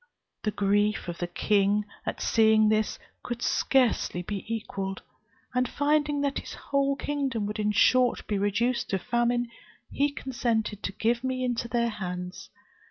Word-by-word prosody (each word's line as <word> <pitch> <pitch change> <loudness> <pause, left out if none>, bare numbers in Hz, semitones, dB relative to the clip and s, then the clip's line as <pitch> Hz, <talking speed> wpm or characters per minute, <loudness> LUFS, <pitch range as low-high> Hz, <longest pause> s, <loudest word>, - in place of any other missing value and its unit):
The 215 - 0
grief 205 0 +1
of 170 -1 -5
the 175 - -1
king, 205 +3 +2 0.2
at - - -3
seeing 220 -1 +5
this, 215 0 +1 0.2
could 240 -1 -5
scarcely 245 -8 +2
be 200 +1 -4
equalled; 195 -4 -4 0.5
and 250 0 +1
finding 295 0 +1
that 280 -1 0
his - - -8
whole 275 0 0
kingdom 275 -7 -2
would 210 +1 -4
in 210 0 +1
a - - +1
short 250 +3 +4
time - - -11
be 205 -2 0
reduced 230 +5 0
to 195 - +1
famine, 240 +3 0 0.4
he 285 +1 +2
consented 235 -6 -2
to - - -2
give 235 +4 0
me 255 -1 -1
into 240 -1 -1
their 235 0 +1
hands. 180 -3 -6
225 Hz, 165 wpm, -27 LUFS, 205-255 Hz, 0.5 s, seeing